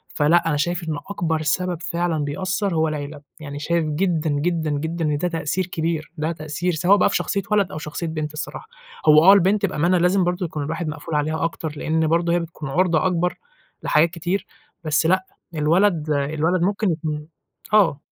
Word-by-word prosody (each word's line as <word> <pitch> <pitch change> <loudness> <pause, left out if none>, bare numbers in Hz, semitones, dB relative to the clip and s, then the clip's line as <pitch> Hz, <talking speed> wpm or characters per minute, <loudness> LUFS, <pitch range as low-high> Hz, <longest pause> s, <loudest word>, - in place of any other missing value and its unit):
فلأ، 165 +3 +3
أنا 145 - +1
شايف 175 +3 -1
إن 150 - -2
أكبر 160 -5 -1
سبب 175 +2 -1
فعلًا 170 -4 -1
بيأثّر 185 +5 -2
هو 160 0 +2
العيلة. 145 -1 -5 0.2
يعني 145 -2 -7
شايف 170 +1 0
جدًا، 160 0 0
جدًا، 155 +2 0
جدًا 160 +3 -2
إن 150 -1 +1
ده 180 - 0
تأثير 165 +2 -2
كبير. 165 -3 -3
ده 155 +2 -1
تأثير 155 +3 -3
سواء 185 +5 +4
بقى - - +3
في - - -2
شخصية 200 - 0
ولد 205 -3 +2
أو - - -6
شخصية 155 +2 -5
بنت 155 -1 -4
الصراحة. 150 - -6 0.4
هو 155 +1 +7
آه 195 - +10
البنت 200 +2 +3
بأمانة 180 0 +1
لازم 180 +2 +3
برضو 180 +1 -1
يكون 150 -2 -4
الواحد 160 +3 -3
مقفول 155 +1 -5
عليها 155 +2 0
أكتر، 160 -2 -3
لإن 160 +1 0
برضو 170 +1 +1
هي 175 - +3
بتكون 160 -4 -7
عُرضة 170 +2 +2
أكبر 180 0 0 0.5
لحاجات 160 +2 +3
كتير. 175 +3 -3 0.4
بس 155 0 +1
لأ، 185 +3 +2 0.3
الولد 160 +1 +2
الولد 155 +5 0
ممكن 200 +1 +1
يكون 155 -2 -4 0.5
آه. 175 -9 +4
165 Hz, 185 wpm, -22 LUFS, 155-180 Hz, 0.5 s, آه